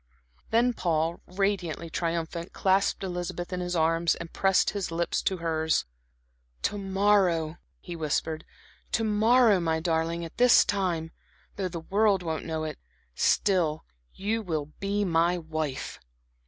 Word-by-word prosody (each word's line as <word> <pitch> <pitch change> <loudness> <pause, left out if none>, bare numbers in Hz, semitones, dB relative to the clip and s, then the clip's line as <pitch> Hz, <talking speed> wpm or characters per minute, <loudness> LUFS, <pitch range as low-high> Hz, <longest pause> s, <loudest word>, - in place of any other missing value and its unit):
Then 240 +2 +3
Paul, 165 -4 -1
radiantly 180 -4 -2
triumphant, 170 +1 -3
clasped 195 +1 +1
Elizabeth 175 -1 -4
in 180 - -2
his 180 0 -2
arms, 165 +1 +2
and 170 -1 -9
pressed 195 -1 +3
his 200 -2 -3
lips 170 +1 -1
to 190 - 0
hers. 160 -2 0 0.8
"To 205 - 0
morrow," 190 -5 +2 0.2
he 175 - -7
whispered, 160 0 -2 0.5
"to 225 - +2
morrow, 220 0 +4
my 160 -2 0
darling, 165 0 -1
at 165 - -11
this 250 0 +6
time 175 -5 -1 0.4
though 195 -2 -2
the 170 -1 -5
world 200 +1 +2
won't 160 -2 -3
know 160 -1 -3
it 155 -1 -5 0.3
still 165 - +1 0.3
you 215 +4 -2
will 155 -6 -3
be 200 +1 0
my 170 0 +2
wife." 155 -4 -4
175 Hz, 140 wpm, -27 LUFS, 160-195 Hz, 0.8 s, this